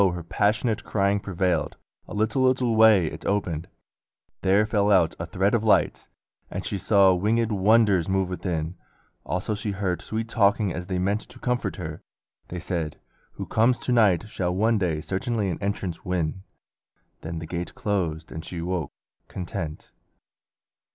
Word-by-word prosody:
her 85 - -6
passionate 105 +6 0
Crying 100 0 +1
prevailed. 90 -5 -1 0.3
A - - -7
little 110 +5 +1
little 130 -3 +2
way 110 -5 +6
It - - -6
opened: 90 -6 -1 0.7
there 100 +3 +4
fell 105 -2 +1
out 90 -5 +4
a 85 - -4
thread 95 +4 +1
of 115 -2 +2
light, 110 - +2 0.4
And - - -5
she 100 - -3
saw 100 -1 +5
wingèd 110 +5 +1
wonders 100 -3 +3
move 95 -1 +1
within; 90 -2 -3 0.5
Also 95 +4 -1
she 105 +1 -4
heard 95 -2 -2
sweet 110 +1 -3
talking 100 -3 +2
as 90 0 -5
they 95 -2 -2
meant 100 +4 0
To - - -14
comfort 125 -1 -1
her. 80 -4 -6 0.5
They 90 - -5
said, 85 -3 -3 0.3
"Who - - -6
comes 120 +3 +3
to 125 - -3
night 110 -5 +4
Shall 90 -4 -2
one 110 +3 +2
day 80 -5 0
certainly 105 +2 -1
an - - -5
entrance 100 -4 -3
win;" 90 -1 -2 0.8
Then 80 +1 -5
the 80 - -5
gate 85 +2 -5
closed 85 -6 -2
and 80 - -6
she 90 - -7
awoke 85 -2 -2 0.4
content. 80 -4 -6
95 Hz, 160 wpm, -25 LUFS, 90-110 Hz, 0.8 s, way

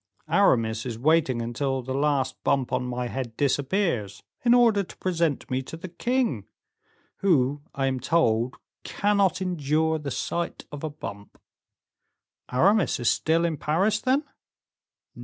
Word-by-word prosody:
Aramis 115 - +3
is 120 -3 -5
waiting 135 -3 +2
until 130 +2 -2
the 130 +2 -4
last 140 -2 0
bump 135 -2 +1
on 125 0 +1
my 125 0 -3
head 120 -2 -5
disappears, 140 - 0 0.2
in 240 0 +5
order 230 -4 +5
to 190 - -10
present 170 -5 -1
me 130 +1 0
to 150 +5 -9
the 185 +2 -8
king, 180 - -1 0.7
who 145 -7 +2
I 135 -2 0
am 130 -1 0
told 125 -4 +1 0.3
cannot 200 -3 +1
endure 160 -2 0
the 145 -2 -5
sight 170 +6 -3
of 145 0 -8
a 155 - -1
bump." 100 -9 -9 1.1
"Aramis 185 - +3
is 120 - +3
still 165 +2 +1
in 165 -3 -1
Paris, 195 +10 +1
then?" 270 +3 +2
145 Hz, 140 wpm, -26 LUFS, 130-175 Hz, 1.1 s, in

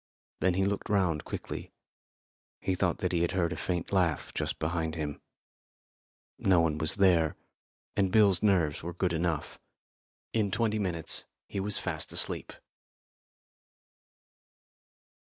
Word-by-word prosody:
Then 90 -1 +2
he 95 +1 +2
looked 100 +2 -2
round 90 -7 +1
quickly. - - -6 0.9
He 95 - 0
thought 90 -1 +1
that 90 - 0
he 85 -2 +1
had 85 - +1
heard 90 -2 +1
a - - -4
faint 90 -2 -2
laugh 90 -7 +1
just - - -2
behind 80 0 -1
him. 75 -3 -4 1.2
No 95 -3 +4
one 80 -2 +1
was 80 0 +2
there, 90 -6 +4 0.6
and 95 -2 +2
Bill's 100 -4 +5
nerves 90 -8 +2
were 85 +1 -5
good 90 -1 0
enough. 80 -2 -1 0.7
In 110 -3 +2
twenty 110 +1 +1
minutes 85 -5 -2 0.2
he 100 - -4
was 100 +1 +1
fast - - -3
asleep. - - -2
90 Hz, 135 wpm, -30 LUFS, 80-100 Hz, 1.2 s, Bill's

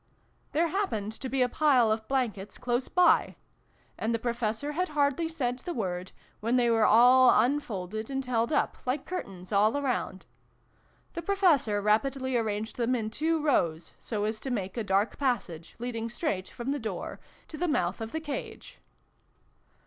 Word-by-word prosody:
" - - -39
There 330 +2 +2
happened 230 - -1
to 260 +3 -6
be 260 0 +2
a - - +2
pile 250 -4 +3
of 220 0 -2
blankets 220 -7 -2
close 245 +1 -1
by: 360 -1 +3 0.6
and 225 +1 0
the - - +1
Professor 235 +3 -2
had 360 +5 -1
hardly 295 +2 +1
said 255 -6 -2
the 345 +7 -5
word, 185 -4 -3 0.3
when 230 +3 0
they 240 -1 +3
were 225 -1 +4
all 250 +3 +7
unfolded 220 -5 -1
and 270 -1 -2
held 235 0 0
up 295 - +1
like 265 +3 -1
curtains 195 - -6
all 215 +6 +3
around. 255 -8 -2 0.9
The 335 - -4
Professor 320 - +2
rapidly 260 +5 +1
arranged 220 -1 -2
them 245 +1 +1
in 220 -2 -3
two 320 +4 0
rows, 170 - +1
so 210 -3 -3
as 215 +1 -2
to 270 - -5
make 195 -6 -3
a 230 - -2
dark 200 +2 0
passage, 205 - -2
leading 230 -1 -4
straight 215 - -2
from 245 +3 -4
the 290 - -1
door 215 -6 -5 0.3
to - - -8
the 350 +3 -1
mouth 295 -6 0
of 225 0 -5
the 320 - -2
cage. 295 -3 -7
240 Hz, 170 wpm, -28 LUFS, 215-285 Hz, 0.9 s, all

